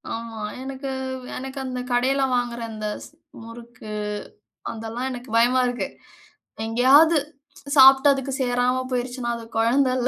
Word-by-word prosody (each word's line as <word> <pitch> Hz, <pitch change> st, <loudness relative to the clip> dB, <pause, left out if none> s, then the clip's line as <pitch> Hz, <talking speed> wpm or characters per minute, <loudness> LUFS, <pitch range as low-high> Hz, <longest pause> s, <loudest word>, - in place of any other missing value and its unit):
ஆமா. 230 Hz, -1 st, -7 dB, 0.2 s
எனக்கு 270 Hz, +1 st, -6 dB, 0.5 s
எனக்கு 265 Hz, +1 st, -7 dB
அந்த 255 Hz, -1 st, -4 dB
கடையில 260 Hz, +3 st, +2 dB
வாங்குற 240 Hz, -1 st, -2 dB
அந்த 215 Hz, -1 st, -5 dB, 0.2 s
ஸ் -, -, -14 dB, 0.3 s
முறுக்கு, 230 Hz, -1 st, -11 dB, 0.8 s
அதெல்லாம் 225 Hz, +3 st, -5 dB
எனக்கு 245 Hz, -2 st, -8 dB
பயமா 245 Hz, +2 st, +4 dB
இருக்கு. 245 Hz, 0 st, -2 dB, 0.8 s
எங்கெயாது 275 Hz, +8 st, +5 dB, 0.6 s
சாப்பிட்டு 270 Hz, +1 st, +8 dB
அதுக்கு 270 Hz, 0 st, -4 dB
சேராம 250 Hz, 0 st, +1 dB
போயிருச்சுனா, 245 Hz, -1 st, -2 dB
அது 230 Hz, -, -9 dB
கொழந்தல்ல 255 Hz, +2 st, +2 dB
250 Hz, 120 wpm, -23 LUFS, 235-265 Hz, 0.8 s, சாப்பிட்டு